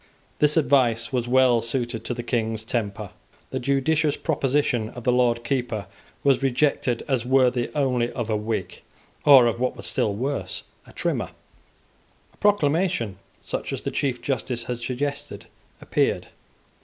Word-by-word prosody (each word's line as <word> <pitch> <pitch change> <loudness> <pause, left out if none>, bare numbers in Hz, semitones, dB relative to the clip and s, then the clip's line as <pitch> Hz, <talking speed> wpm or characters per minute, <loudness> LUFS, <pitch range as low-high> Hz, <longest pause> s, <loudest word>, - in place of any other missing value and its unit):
This 150 +1 +4
advice 125 -6 +2
was 120 -2 0
well 125 -2 +4
suited 120 0 -2
to 125 - -3
the 120 - -5
King's 110 -2 -1
temper. 110 -3 -3 0.4
The - - -2
judicious 145 +3 +1
proposition 135 -7 0
of 120 0 -10
the 125 - +3
Lord 120 -1 +2
Keeper 120 -5 -2 0.4
was 140 -2 +3
rejected 135 -2 +1
as 130 -5 0
worthy 125 -1 +2
only 125 -4 +1
of 120 -4 -3
a 110 - 0
Whig, 105 +1 -3 0.4
or 135 -4 +9
of 115 0 0
what 125 0 -1
was - - -7
still 105 -2 +1
worse, 135 +6 -2 0.2
a - - -13
Trimmer. - - -2 1.0
A - - -27
proclamation, 160 - +1 0.3
such - - -4
as - - -4
the - - -2
Chief 130 -3 -2
Justice 125 -3 -2
had 120 0 -4
suggested, 140 -2 -4 0.3
appeared. - - 0
125 Hz, 150 wpm, -24 LUFS, 115-140 Hz, 1.0 s, or